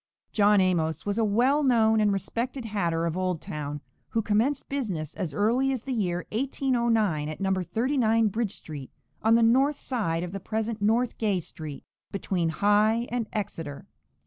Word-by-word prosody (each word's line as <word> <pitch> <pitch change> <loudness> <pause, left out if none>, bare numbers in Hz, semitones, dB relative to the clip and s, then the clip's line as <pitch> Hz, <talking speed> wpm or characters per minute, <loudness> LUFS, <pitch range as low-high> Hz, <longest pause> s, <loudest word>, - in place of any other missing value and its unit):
John 205 -1 +4
Amos 170 -4 +1
was 205 +2 -1
a - - +3
well 245 +8 +3
known 225 -5 +4
and 210 -1 +3
respected 230 +6 -3
hatter 170 -6 -1
of 165 -1 -1
Old 185 -2 -1
Town, 145 -1 -5 0.3
who 225 - 0
commenced 220 +8 +1
business 190 - -3
as 185 -7 -3
early 235 - +2
as 255 -4 -3
the 270 - -3
year 180 -6 -1
1809 230 - +1
at 155 - -6
No. 195 -1 +1
39 225 +3 +1
Bridge 220 0 -2
street, 145 -4 -8 0.3
on 225 +1 +4
the 230 - +4
north 270 +6 +4
side 175 -10 -1
of 180 - -5
the 195 - -5
present 220 +1 -3
North 230 +4 +1
Gay 205 -4 +1
street, 155 -3 -7 0.3
between 180 -3 -1
High 210 +6 +2
and 240 -2 -1
Exeter. 165 -8 -5
210 Hz, 170 wpm, -27 LUFS, 180-235 Hz, 0.3 s, John